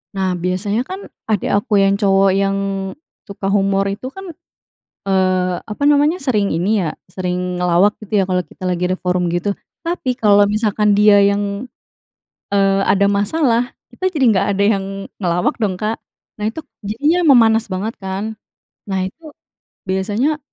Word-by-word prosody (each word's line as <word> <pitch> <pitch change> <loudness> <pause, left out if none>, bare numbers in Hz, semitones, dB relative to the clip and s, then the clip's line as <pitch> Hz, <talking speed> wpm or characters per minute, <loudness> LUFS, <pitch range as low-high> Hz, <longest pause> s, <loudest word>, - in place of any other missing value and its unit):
Nah, 190 -1 0
biasanya 185 +5 -1
kan, 375 +9 -7 0.2
adik 210 -3 0
aku 205 +1 +2
yang 195 0 +4
cowok, 195 -1 +3
yang 195 0 +1 0.7
suka 200 0 -7
humor 195 0 +2
itu 200 +6 -4
kan, 385 +8 -10 0.8
eee, 185 -1 +1
apa 210 +5 -8
namanya, 295 +4 +3
sering 215 - 0
ini 190 +5 +1
ya, 160 - -1 0.2
sering 180 0 -3
ngelawak, 180 +4 +3
gitu 215 0 -1
ya, 195 - +3
kalau 180 -1 0
kita 185 - -9
lagi 180 0 -1
ada 185 - -1
forum 180 -1 0
gitu. 175 +4 -1 0.3
Tapi, 265 -7 -2
kalau 205 -3 +5
misalkan 210 -1 +1
dia 205 -1 +6
yang, 200 +3 0 0.9
eee, 195 0 +3
ada 200 0 +3
masalah, 235 +4 +1 0.2
kita 375 - -2
jadi 315 -7 -1
nggak 200 -1 +1
ada 200 - +1
yang, 200 -2 +2 0.3
ngelawak 175 -2 0
dong, 205 -4 0
Kak. 215 +4 -3 0.4
Nah, 210 - -1
itu, 310 +9 -5 0.2
jadinya 290 - +1 0.2
memanas 225 -1 +4
banget, 195 +3 -3
kan. 200 +3 -5 0.5
Nah 190 -1 0
itu, 190 - -9 0.6
biasanya, 205 +11 0
200 Hz, 155 wpm, -18 LUFS, 190-220 Hz, 0.9 s, dia